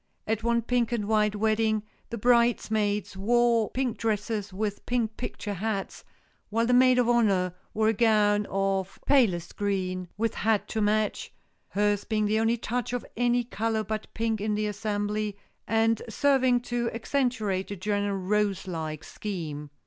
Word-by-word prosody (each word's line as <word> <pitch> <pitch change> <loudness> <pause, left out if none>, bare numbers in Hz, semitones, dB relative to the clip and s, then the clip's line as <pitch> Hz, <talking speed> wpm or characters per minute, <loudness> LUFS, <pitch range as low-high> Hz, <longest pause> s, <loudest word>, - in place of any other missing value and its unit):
At 220 0 -1
one 235 0 +1
pink 245 0 +1
and 215 -4 -1
white 210 -1 +2
wedding 215 0 +1 0.3
the 235 - -4
bridesmaids 215 -4 +2
wore 230 +2 +2
pink 250 -5 -2
dresses 210 -2 -1
with 205 +1 -3
pink 230 -3 0
picture 210 -4 -5
hats, 200 +1 -3 0.5
while 230 +2 +1
the 250 - +2
maid 255 0 +6
of 245 -2 +3
honor 200 -7 +2 0.2
wore 220 0 +3
a - - +2
gown 210 -2 +3
of 195 -1 -1
palest 190 -12 +2
green 185 -3 -1
with 225 +1 0
hat 220 -1 +1
to 220 - -1
match,—hers 205 -1 -1
being 215 -1 0
the 215 +1 +2
only 225 +1 +2
touch 240 +2 -3
of 245 - -2
any 245 +1 +2
color 225 -1 -1
but 215 +1 -5
pink 225 -2 -1
in 210 0 0
the 210 0 0
assembly, 210 0 -2 0.3
and 225 0 +2
serving 260 0 +3
to 240 -1 -2
accentuate 230 -6 -1
the 200 - -5
general 205 +1 -1
rose 200 0 0
like 160 -3 -4
scheme. 155 -8 -5
215 Hz, 155 wpm, -27 LUFS, 205-235 Hz, 0.5 s, maid